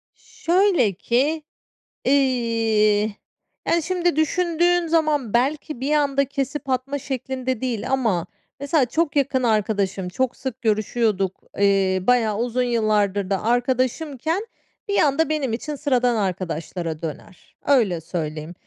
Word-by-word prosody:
Şöyle 385 - +1
ki, 265 - 0 0.6
iii, 225 -6 +2 0.5
yani, 335 -1 +2
şimdi 350 -2 0
düşündüğün 345 +2 +2
zaman 305 -8 +1
belki 275 +3 0
bir 280 - -1
anda 280 -2 +2
kesip 275 +1 -4
atma 265 +2 -1
şeklinde 260 -2 -3
değil 245 -5 -2
ama 225 -11 +1 0.3
mesela 280 0 +2
çok 315 +4 -1
yakın 270 -2 +1
arkadaşım, 200 -4 0
çok 255 +6 -1
sık 260 -1 -5
görüşüyorduk, 215 -3 0
eee, 195 -2 +3
bayağı 225 -4 +3
uzun 245 +2 0
yıllardır 210 -5 +1
da 195 -1 -1
arkadaşımken 260 - 0 0.4
bir 405 - +1
anda 295 +2 +2
benim 290 -6 -1
için 295 +6 -4
sıradan 250 -4 +1
arkadaşlara 175 -4 -3
döner. 165 +2 -9
Öyle 220 -12 +3
söyleyeyim. 155 -1 -5
250 Hz, 120 wpm, -22 LUFS, 210-290 Hz, 0.6 s, eee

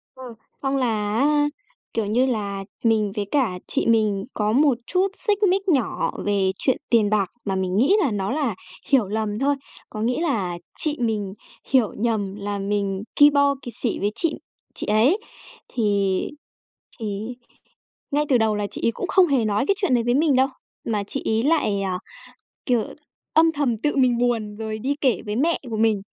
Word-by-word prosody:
Ừ, 260 - -11 0.4
xong 270 0 0
là 215 -5 0
á, 295 +2 +3 0.5
kiểu 225 -3 0
như 245 +5 +2
là, 200 -5 -2 0.2
mình 215 -3 +2
với 205 - 0
cả 245 -11 +1
chị - - -1
mình 215 -4 +2
có 210 0 0
một 270 -1 +4
chút 370 +2 +2
xích 420 -4 +1
mích 390 +1 0
nhỏ 275 - +1 0.2
về 200 -2 +2
chuyện 260 - +1
tiền 220 -3 +4
bạc 200 -3 +1
mà 195 - -1
mình 185 0 -1
nghĩ 270 - +4
là 290 - +2
nó 195 -2 -2
là 275 -7 0 0.3
hiểu 260 -8 +4
lầm 215 0 -2
thôi, 280 +3 +2 0.4
có 215 - -6
nghĩa 245 +6 0
là 200 - -1 0.2
chị 305 -1 -1
mình 215 -5 -1 0.4
hiểu 250 -6 +3
nhầm 210 -3 -1
là 205 0 -3
mình 200 -1 -1
ki 290 0 +8
bo 280 -1 +3
kẹt 240 - -8
xỉ 235 - 0
với 205 - +1
chị 320 +7 -1 0.4
chị - - -5
ấy. 230 - +4 0.5
Thì 200 -5 +1 0.8
thì 210 0 -4 0.8
ngay 295 0 +1
từ 255 - +4
đầu 220 -2 +2
là 205 - -1
chị - - -8
ấy 230 - +4
cũng 375 - -3
không 375 -2 +5
hề 270 -7 +2
nói 210 +2 +1
cái 400 - +4
chuyện 385 -11 +2
đấy 235 -1 +2
với 240 +1 +2
mình 290 -1 +3
đâu, 260 +1 +4 0.4
mà 210 -3 -1
chị - - -5
ấy 220 +1 +1
lại, 290 -7 +2 0.9
kiểu, 240 -4 +2 0.5
âm 325 +1 +5
thầm 280 -6 0
tự 295 -1 0
mình 250 -3 +3
buồn 225 -4 0
rồi 220 0 -4
đi 270 +6 -1
kể 260 -4 +2
với 210 0 -2
mẹ 325 +7 +2
của 220 - -2
mình. 215 -2 +2
230 Hz, 190 wpm, -23 LUFS, 205-275 Hz, 0.9 s, ki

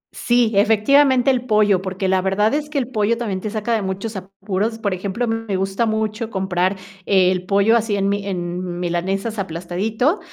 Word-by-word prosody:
Sí, 240 -2 +2
efectivamente 250 +6 +4
el 250 -1 -1
pollo, 210 -3 +3
porque 190 0 -3
la 190 0 +2
verdad 200 +4 +1
es 295 0 -2
que 300 - -4
el 250 -3 0
pollo 230 -1 0
también 200 -6 -3
te 215 - -3
saca 220 +2 -2
de 220 - +1
muchos 195 +3 -4
apuros. 195 +3 -3
Por 205 -4 -2
ejemplo, 200 +6 -3
me 225 -3 -2
gusta 195 +4 -1
mucho 220 +1 -2
comprar 190 -1 -1 0.3
el 185 -1 +2
pollo 200 +3 +3
así 220 -3 +1
en 195 0 0
mi 200 0 -2
en 175 -1 -4
milanesas 190 +5 -2
aplastadito 200 - -1
205 Hz, 180 wpm, -20 LUFS, 190-225 Hz, 0.3 s, efectivamente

